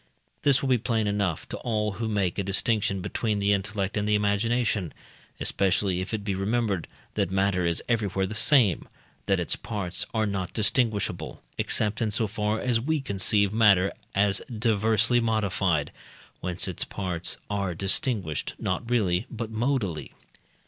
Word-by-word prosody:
This 140 -1 +3
will 135 - 0
be 125 -2 +4
plain 110 -1 0
enough 100 -6 -1
to - - -4
all 105 -3 -1
who 110 +3 -4
make 100 -4 0
a - - 0
distinction 100 0 0
between 105 +3 -1
the 100 0 +2
intellect 100 0 -2
and 105 0 0
the 105 - +3
imagination, 105 -2 0 0.4
especially 95 -1 +1
if 95 - -5
it 110 -2 -3
be 100 -1 -1
remembered, 100 -1 -1 0.3
that - - 0
matter 95 -2 +1
is 85 - -1
everywhere 100 -5 0
the 95 - -5
same, 110 - +4 0.4
that 95 -2 +2
its 85 - 0
parts 100 -2 -2
are 110 -1 +1
not 95 -3 -3
distinguishable, 110 -1 0 0.2
except 105 +2 +1
in 110 - +1
so 110 +2 +1
far 105 +1 -1
as 120 -2 +1
we 155 +4 0
conceive 100 -4 +1
matter 100 -4 +5 0.2
as 100 0 +2
diversely 115 +1 +2
modified, 100 -9 0 0.5
whence 90 0 -2
its - - -1
parts 90 -3 -2
are 100 -4 -2
distinguished, 95 - 0
not 115 +6 -3
really, 105 -3 +1
but 115 -1 -5
modally. 110 - -1
105 Hz, 155 wpm, -26 LUFS, 95-115 Hz, 0.5 s, matter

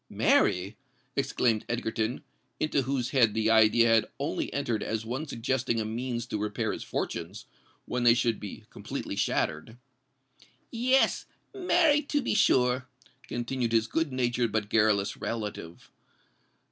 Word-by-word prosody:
"Marry!" 95 +4 +2 0.4
exclaimed 115 -3 +1
Egerton, 115 0 -2 0.4
into 155 -2 +1
whose 130 -2 -2
head 115 -6 +3
the 110 0 +2
idea 110 +1 +5
had 115 -1 +4
only - - -2
entered 115 -3 -1
as 110 0 -3
one 130 +7 -4
suggesting 120 -1 -1
a 110 - -1
means 120 +1 -3
to 105 - -4
repair 105 0 -2
his - - -6
fortunes, 85 +5 -4 0.4
when 125 - -2
they 120 -1 +6
should 115 -2 0
be 100 - -8
completely - - -6
shattered. 80 +9 -1 0.9
"Yes—marry, 295 - +1
to 290 0 -1
be 265 - -1
sure!" 125 -8 +3 0.4
continued 120 0 -2
his 110 -1 +3
good 160 +6 -1
natured 120 -2 0
but 105 -1 -1
garrulous 105 -2 +2
relative. 105 -7 -6
115 Hz, 135 wpm, -28 LUFS, 110-130 Hz, 0.9 s, they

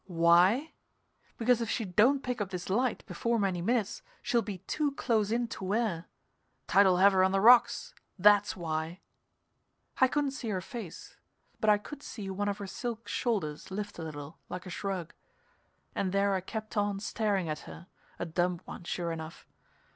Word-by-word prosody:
"Why? 180 - +4 0.6
Because 240 0 +3
if 230 - -2
she 225 - -1
don't 235 +9 +3
pick 250 -3 -2
up 200 - -2
this 180 0 -5
light 245 +5 0
before 235 0 -1
very - - 0
many 175 -1 -3
minutes 225 +1 0 0.2
she'll 240 -2 +2
be 205 -4 -5
too 290 - -2
close 220 -6 +1
in 235 +1 +1
to 195 - -7
wear 190 -4 -1 0.6
tide'll 190 -2 +5
have 195 +2 +6
her 185 -1 +4
on 190 - +3
the 195 - +2
rocks 240 - +5 0.2
that's 205 +1 +5
why!" 165 +1 -3 1.0
I 260 - +7
couldn't 285 +1 0
see 250 -4 -5
her 190 -3 -1
face, 195 -2 -8 0.4
but 215 - +2
I 210 - +6
could 280 +7 -10
see 200 -8 -6
one 205 +2 -1
of 200 - -2
her 200 - -6
silk 230 +3 -5
shoulders 190 -12 -2
lift 205 0 -5
a - - -4
little, 150 0 -8
like 180 +1 -6
a 185 - -7
shrug. 185 -3 -4 0.8
And 190 - -1
there 200 +1 +2
I 190 - 0
kept 215 +3 -6
on 205 -1 0
staring 205 -3 -1
at 155 -1 -5
her, 170 - -10 0.3
a - - -3
dumb 175 +1 0
one, - - -8
sure 170 0 -3
enough. 160 0 -7
200 Hz, 185 wpm, -30 LUFS, 180-230 Hz, 1.0 s, I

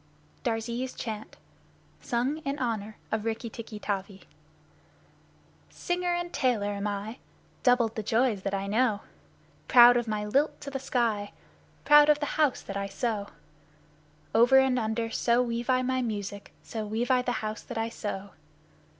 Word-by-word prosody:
Darzee's 235 +2 -2
Chant 220 -2 -6 0.6
(Sung 250 +5 -1
in 285 -3 -3
honor 220 -5 -3
of 220 -1 -1
Rikki 225 +1 -3
tikki 225 -1 -8
tavi) 195 -1 -4 1.5
Singer 355 -1 -1
and 350 0 -4
tailor 225 -6 +1
am 200 0 -3
I 205 +4 -4 0.4
Doubled 245 -3 +3
the 220 - -2
joys 225 -1 +1
that 195 +1 -3
I 195 0 -2
know 215 0 +1 0.7
Proud 245 -1 +8
of 240 -1 -1
my 210 -1 -2
lilt 275 +9 +1
to 280 - -6
the 270 - -3
sky, 230 -6 -1 0.5
Proud 295 0 +7
of 300 -1 +5
the 295 - -2
house 290 -4 +2
that 195 - -7
I 200 0 -2
sew 210 -1 -2 1.1
Over 240 +4 +6
and 265 -1 +4
under, 225 0 -2
so 235 +2 +2
weave 235 +1 -3
I 255 0 +3
my 260 0 0
music 205 -3 -4
so 220 -1 -5
weave 225 +4 -1
I 255 -1 +4
the 250 0 -1
house 215 0 -4
that - - -8
I 225 0 -1
sew. 200 -3 -5
230 Hz, 160 wpm, -28 LUFS, 210-255 Hz, 1.5 s, Proud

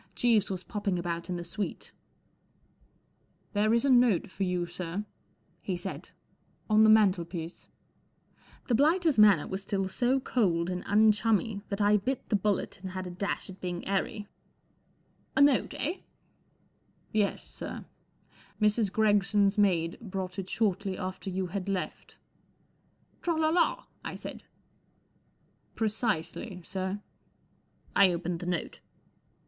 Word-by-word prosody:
Jeeves 230 -4 +3
was 185 -2 -4
popping 205 -3 -2
about 170 0 -3
in 180 - -1
the 175 - -4
suite* 195 +4 -5 1.6
1 205 - 0
There 215 - +3
is 235 +3 +3
a - - +3
note 240 -7 +4
for - - -10
you* 180 -1 0
sir*" 175 +3 -5 0.6
he 185 -3 -2
said* 175 - -6 0.6
1 215 - +2
on - - +8
the 220 - +6
mantelpiece*" 180 -5 +2 1.0
The 245 - +1
blighter's 310 - +3
manner 205 -7 +6
was 190 +1 -4
still 195 -1 -1
so 245 +7 +1
cold 180 -9 +1
and 180 0 -3
unchummy 215 0 +3
that 200 +1 -2
I 205 +1 +5
bit 250 +6 -3
the - - +3
bullet 200 -2 -1
and 185 -1 -6
had 185 0 -4
a 180 - -6
dash 195 +3 -2
at 190 - -14
being 175 -1 -4
airy* 200 +1 -1 0.5
* - - -39
A - - +5
note* 285 -3 +4
eh? 315 +8 -1 0.4
" - - -40
'* 215 -1 -2
Yes* 200 - -4
sir* - - -7 0.7
Mrs. 210 -1 +2
Gregson's 205 -1 +3
maid 175 -6 +2
brought 190 -3 -5
it 190 -1 -5
shortly 195 -3 0
after 185 +1 -5
you 190 0 -2
had 195 +2 -4
left.'" 190 -2 -4 1.0
h - - -38
Tra 340 -1 0
lada! 335 +10 +2
" - - -38
I - - -8
said. - - -8 0.7
" - - -40
Precisely, 215 -3 -2
sir." 190 +2 -4 0.9
I 195 -2 +6
opened 175 0 -3
the 175 - -6
note. 175 -2 -2
200 Hz, 150 wpm, -29 LUFS, 185-220 Hz, 1.6 s, on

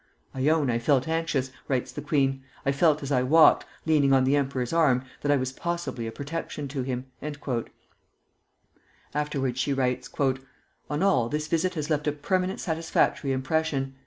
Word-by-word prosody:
"I 135 +2 +1
own 155 -5 +2
I 115 - 0
felt 130 +3 +2
anxious," 160 -5 -1 0.2
writes 130 -3 -1
the 150 - -6
queen; 135 -2 +1 0.2
"I 140 - +3
felt 150 +1 +3
as 140 - -4
I 130 -2 +3
walked, 155 +6 +5 0.2
leaning 145 -4 +4
on 130 -1 +5
the 135 +2 +3
emperor's 135 -3 -1
arm, 140 -7 +3 0.2
that 145 - +1
I 145 - +4
was 130 -1 -2
possibly 170 -6 -3
a - - -4
protection 145 +2 -5
to 135 -1 -3
him." 125 0 -3 2.1
Afterwards 140 -4 -1
she 140 +2 +1
writes, 125 -2 -1 0.8
"On 150 +5 -1
all, 125 -13 +3
this 150 +2 -2
visit 165 +4 0
has 155 0 -3
left 150 0 0
a - - +3
permanent 185 +6 -1
satisfactory 160 -4 0
impression. 135 0 -1
140 Hz, 165 wpm, -27 LUFS, 130-160 Hz, 2.1 s, walked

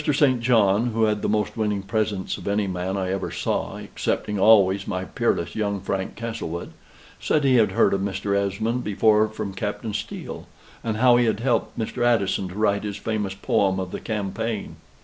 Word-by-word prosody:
St. 135 -4 +3
John 115 -2 +3
(who 115 0 +1
had 105 -1 +1
the - - -1
most 105 -1 0
winning 105 -3 -1
presence 100 -1 -1
of - - -9
any 100 +1 +1
man 95 +1 -2
I 95 -1 -1
ever 95 - -2
saw, - - -2
excepting 105 -1 -3
always 100 -2 +5
my 95 -2 -2
peerless 85 -8 -1
young 100 -2 -1
Frank 95 0 -3
Castlewood) 110 -7 -5 0.5
said 150 - +1
he 130 -2 +4
had 110 -2 +3
heard - - +3
of 100 - 0
Mr. 100 0 -1
Esmond 110 +5 -1
before 105 +1 +3
from 110 -2 -5
Captain 105 +3 -4
Steele, 105 - -6 0.4
and 110 -2 -2
how 120 +1 +5
he 120 - +3
had 110 -1 0
helped 120 -2 0
Mr. 115 +1 -2
Addison 100 -5 +2
to 90 - -10
write 100 -1 +1
his 105 -1 -4
famous 105 -2 -2
poem 95 -1 +1
of 95 -1 -4
the - - -4
"Campaign." 105 0 -3
105 Hz, 190 wpm, -24 LUFS, 95-110 Hz, 0.5 s, always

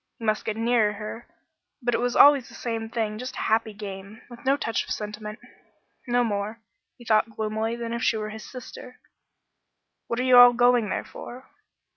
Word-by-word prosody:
He 230 - -8
must 215 0 0
get 220 0 -2
nearer 225 -2 +2
her, 215 +2 -8 0.5
but 245 -2 -1
it - - +1
was 245 0 -1
always 280 -4 +6
the - - -13
same 225 -2 -4
thing; 220 -2 -2
just 255 +1 -6
a - - -4
happy 220 0 +1
game, 200 0 -9
with 240 - -12
no 270 +2 +2
touch 225 -5 -1
of - - -14
sentiment 210 0 -5 0.7
no 245 0 +2
more, 210 0 -3 0.4
he 240 - -15
thought 220 0 +3
gloomily, 220 +1 -2
than 235 -1 -5
if 235 - -3
she 225 - +2
were 215 0 -4
his 220 0 -9
sister. 250 0 -10 1.1
"What 235 - -2
are - - +1
you 255 -1 +6
all 245 0 +10
going 245 -3 +3
there - - -2
for?" 255 +2 -11
230 Hz, 195 wpm, -25 LUFS, 215-245 Hz, 1.1 s, all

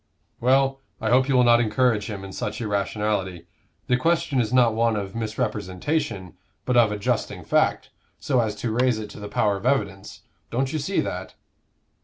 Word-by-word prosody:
"Well, 135 +2 +2 0.2
I 110 - -1
hope 130 +2 +4
you 135 - +3
will 125 - +5
not 120 -1 +6
encourage 115 -1 +1
him 100 -2 -6
in 95 - -8
such - - -4
irrationality; 100 -4 -2 0.4
the 125 - +2
question 155 -2 +1
is 110 -1 -2
not 125 -3 +4
one 115 0 +2
of 100 -2 -4
misrepresentation, 105 - -3 0.3
but 125 - 0
of 115 -3 +5
adjusting 105 -1 -2
fact, - - +1 0.3
so 130 -3 +1
as 110 -3 0
to 110 +2 -3
raise 125 0 +2
it 110 -1 -6
to - - -10
the 105 0 -7
power 100 0 +1
of 100 - -10
evidence. 100 -8 -1 0.3
Don't 130 +4 -1
you 155 - -1
see 190 +7 0
that?" - - -5
115 Hz, 180 wpm, -24 LUFS, 105-130 Hz, 0.4 s, not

